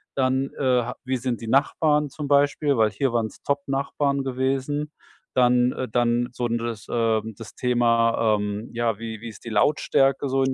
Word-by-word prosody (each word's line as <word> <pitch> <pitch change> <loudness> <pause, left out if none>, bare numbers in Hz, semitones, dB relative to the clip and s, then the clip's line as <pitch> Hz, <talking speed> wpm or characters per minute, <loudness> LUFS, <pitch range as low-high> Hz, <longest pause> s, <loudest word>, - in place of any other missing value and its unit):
dann, 130 0 +1
äh, - - -3 0.2
ha 125 +2 -6
wie 130 0 -1
sind 120 -1 -3
die 115 - -6
Nachbarn 150 +3 +2
zum 145 +2 -6
Beispiel? 145 0 +2
Weil 110 -2 +3
hier 125 +4 -1
waren's 115 -2 -2
top 140 0 0
Nachbarn 140 0 -1
gewesen. 135 +3 -2 0.4
Dann, 125 0 +4
äh 130 - -4
dann 120 +1 +1
so 120 0 -2
das, 115 -2 -3
ähm 110 -2 0
das - - -10
Thema, 115 -2 +2
ähm, 105 +2 -4
ja, 115 -2 0
wie 110 -1 -7
wie 115 - -7
ist 110 - -14
die - - -5
Lautstärke 135 +3 +2
so 135 0 +1
in 130 0 +1
125 Hz, 180 wpm, -24 LUFS, 115-135 Hz, 0.4 s, Dann